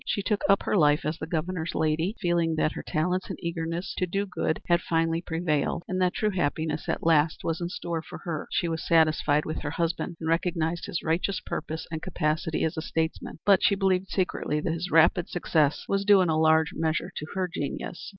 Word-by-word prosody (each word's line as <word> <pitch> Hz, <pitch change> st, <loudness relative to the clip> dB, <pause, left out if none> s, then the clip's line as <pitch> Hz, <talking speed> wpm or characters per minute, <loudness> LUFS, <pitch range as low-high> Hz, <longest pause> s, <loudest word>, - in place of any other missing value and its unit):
She 200 Hz, -, -1 dB
took 205 Hz, +1 st, 0 dB
up 195 Hz, -, +4 dB
her -, -, 0 dB
life 150 Hz, -4 st, +4 dB
as 155 Hz, +2 st, -2 dB
the 160 Hz, -, -5 dB
Governor's 170 Hz, 0 st, -2 dB
lady 160 Hz, +6 st, 0 dB
feeling 170 Hz, -3 st, +1 dB
that 155 Hz, 0 st, +1 dB
her -, -, -6 dB
talents 180 Hz, +3 st, -1 dB
and -, -, -4 dB
eagerness 170 Hz, +2 st, -3 dB
to 185 Hz, -, +1 dB
do 195 Hz, +3 st, -1 dB
good 180 Hz, -4 st, -2 dB
had 170 Hz, 0 st, +3 dB
finally 165 Hz, 0 st, 0 dB
prevailed 165 Hz, -1 st, -1 dB
and 185 Hz, 0 st, -1 dB
that 180 Hz, -1 st, +2 dB
true 215 Hz, -1 st, +1 dB
happiness 160 Hz, -3 st, -1 dB
at -, -, -2 dB
last 160 Hz, -1 st, +3 dB
was 165 Hz, +1 st, -2 dB
in 170 Hz, -, -2 dB
store 170 Hz, -2 st, -3 dB
for -, -, -9 dB
her. 165 Hz, -5 st, -4 dB
She 175 Hz, -, 0 dB
was 165 Hz, -1 st, -3 dB
satisfied 155 Hz, -2 st, +3 dB
with 155 Hz, -, -4 dB
her 145 Hz, -, -3 dB
husband 170 Hz, +2 st, -2 dB
and 160 Hz, -, -4 dB
recognized 165 Hz, 0 st, 0 dB
his 170 Hz, -, -3 dB
righteous 175 Hz, +4 st, 0 dB
purpose 160 Hz, +1 st, -5 dB
and 160 Hz, -1 st, -4 dB
capacity 160 Hz, -2 st, -1 dB
as 160 Hz, -, -1 dB
a -, -, -1 dB
statesman, 160 Hz, 0 st, -3 dB
but 200 Hz, -2 st, +5 dB
she 200 Hz, -, +4 dB
believed 190 Hz, -1 st, +1 dB
secretly 175 Hz, -5 st, -1 dB
that 160 Hz, +1 st, -1 dB
his 170 Hz, +3 st, -4 dB
rapid 165 Hz, +1 st, +4 dB
success 155 Hz, -4 st, +1 dB
was 195 Hz, 0 st, +1 dB
due 200 Hz, -1 st, +6 dB
in 180 Hz, -, +2 dB
a 155 Hz, -1 st, +2 dB
large 160 Hz, 0 st, +4 dB
measure 160 Hz, -1 st, -1 dB
to 150 Hz, -, -5 dB
her 185 Hz, -1 st, 0 dB
genius. 165 Hz, +1 st, -5 dB
165 Hz, 215 wpm, -27 LUFS, 160-180 Hz, -, due